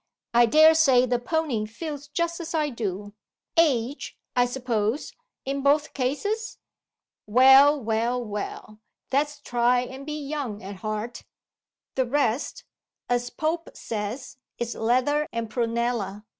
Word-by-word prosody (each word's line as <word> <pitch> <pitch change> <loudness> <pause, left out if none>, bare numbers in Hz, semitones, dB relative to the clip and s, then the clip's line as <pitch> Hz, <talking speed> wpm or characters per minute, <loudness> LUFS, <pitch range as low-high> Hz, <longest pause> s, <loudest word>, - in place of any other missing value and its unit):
I 240 0 +6
dare 310 +6 +7
say 270 -6 +5
the 245 -1 0
pony 250 -5 -1
feels 290 +5 -7
just 340 +3 -2
as 335 0 -5
I 300 -2 +1
do. 205 -3 -4 0.4
Age, 280 -5 +1 0.2
I 245 0 +4
suppose, 245 -1 -2 0.3
in 275 +1 -2
both 290 +2 +2
cases? 405 - -2 0.7
Well! 265 +6 +7
well! 230 +1 0
well! 210 0 -6 0.3
let's 290 +2 0
try 245 -2 +2
and 260 +2 -7
be 300 +1 -5
young 275 -8 -4
at 195 +1 -7
heart. 215 +4 -4 0.7
'The 260 -2 0
rest' 260 -1 0 0.5
(as 245 0 0
Pope 320 +5 -2
says) 225 +6 -5 0.2
'is 240 0 -3
leather 255 +6 +1
and 230 -2 -4
prunella. 230 -3 -1
250 Hz, 130 wpm, -25 LUFS, 230-290 Hz, 0.7 s, dare